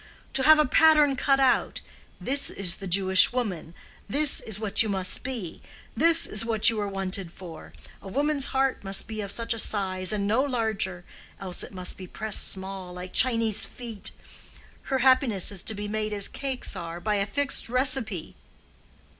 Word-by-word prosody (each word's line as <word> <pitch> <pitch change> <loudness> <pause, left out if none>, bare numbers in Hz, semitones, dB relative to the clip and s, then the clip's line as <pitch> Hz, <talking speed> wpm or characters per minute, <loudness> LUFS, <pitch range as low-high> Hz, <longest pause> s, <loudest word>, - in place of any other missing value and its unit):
To 270 - +2
have 310 +3 +6
a 305 - +3
pattern 300 0 +4
cut 275 0 +1
out—'this 270 +1 -1
is 190 -2 +4
the 195 - -8
Jewish 190 +1 +4
woman; 195 -9 -5 0.3
this 295 +1 +3
is 215 -2 -6
what 215 -2 +1
you 220 - 0
must 190 -2 -1
be; 235 -10 -7 0.3
this 330 0 +3
is 210 +1 -2
what 225 -1 +3
you 220 -2 -4
are 205 - -3
wanted 195 -2 -3
for; 170 -3 -12 0.3
a - - -12
woman's 285 +5 -1
heart 270 -3 -1
must 195 0 0
be 220 -1 -6
of 200 -1 -6
such 230 +1 -1
a 230 - -5
size 185 -3 0
and 205 -2 -2
no 225 +5 +1
larger, 220 -9 -2 0.3
else 185 -2 -5
it - - -9
must 185 -2 -5
be 185 - -10
pressed 220 +2 +3
small, 190 -1 -4
like 180 +1 -9
Chinese 230 -4 +1
feet; 230 -4 -4 0.8
her 270 - 0
happiness 255 - +4
is 195 -3 -4
to 220 - -3
be 205 +1 -6
made 215 0 -3
as 200 -1 0
cakes 265 -2 -3
are, 170 0 -7
by 210 +3 -2
a 200 - -1
fixed 280 +3 +1
receipt. 250 - -1
215 Hz, 180 wpm, -25 LUFS, 190-255 Hz, 0.8 s, have